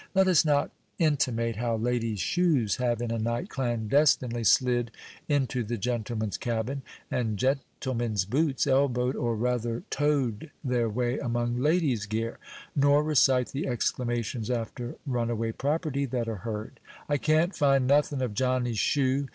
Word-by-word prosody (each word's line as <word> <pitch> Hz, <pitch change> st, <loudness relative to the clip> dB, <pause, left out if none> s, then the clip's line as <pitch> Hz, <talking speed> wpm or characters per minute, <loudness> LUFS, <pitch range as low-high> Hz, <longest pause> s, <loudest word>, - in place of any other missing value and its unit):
Let 190 Hz, 0 st, +5 dB
us 180 Hz, -3 st, +5 dB
not 145 Hz, -2 st, +1 dB, 0.3 s
intimate 125 Hz, -, +1 dB
how 115 Hz, 0 st, 0 dB
ladies' 115 Hz, -2 st, -1 dB
shoes 140 Hz, -, +1 dB
have, 120 Hz, -2 st, 0 dB
in 115 Hz, -, -2 dB
a 115 Hz, -, -1 dB
night, 115 Hz, +2 st, -2 dB
clandestinely 120 Hz, 0 st, +1 dB
slid 120 Hz, +1 st, +3 dB, 0.4 s
into 135 Hz, -4 st, +1 dB
the 115 Hz, +2 st, -3 dB
gentlemen's 110 Hz, -1 st, -2 dB
cabin, 120 Hz, +4 st, -2 dB, 0.3 s
and 110 Hz, -4 st, -1 dB
gentlemen's 120 Hz, -5 st, -1 dB
boots 135 Hz, +5 st, +1 dB
elbowed, 130 Hz, -2 st, +2 dB
or, 120 Hz, -1 st, -1 dB
rather, 120 Hz, 0 st, -1 dB
toed 145 Hz, -3 st, 0 dB
their 125 Hz, -3 st, +1 dB
way 120 Hz, +3 st, -1 dB
among 120 Hz, 0 st, -1 dB
ladies' 145 Hz, -, +1 dB
gear, 115 Hz, +2 st, -3 dB, 0.4 s
nor 145 Hz, +1 st, +4 dB
recite 135 Hz, -4 st, +3 dB
the 140 Hz, -, -3 dB
exclamations 120 Hz, -2 st, -2 dB
after 120 Hz, 0 st, -3 dB
runaway 115 Hz, -3 st, -1 dB
property 140 Hz, +2 st, -1 dB
that 120 Hz, -2 st, -2 dB
are 110 Hz, -2 st, -3 dB
heard. 105 Hz, +2 st, -6 dB, 0.3 s
"I 145 Hz, -, +1 dB
can't 155 Hz, +6 st, +2 dB
find 135 Hz, -2 st, +3 dB
nothin' 140 Hz, 0 st, +2 dB
of 120 Hz, -4 st, -2 dB
Johnny's 125 Hz, -1 st, 0 dB
shoe!" 140 Hz, 0 st, +1 dB
125 Hz, 145 wpm, -28 LUFS, 115-140 Hz, 0.4 s, Let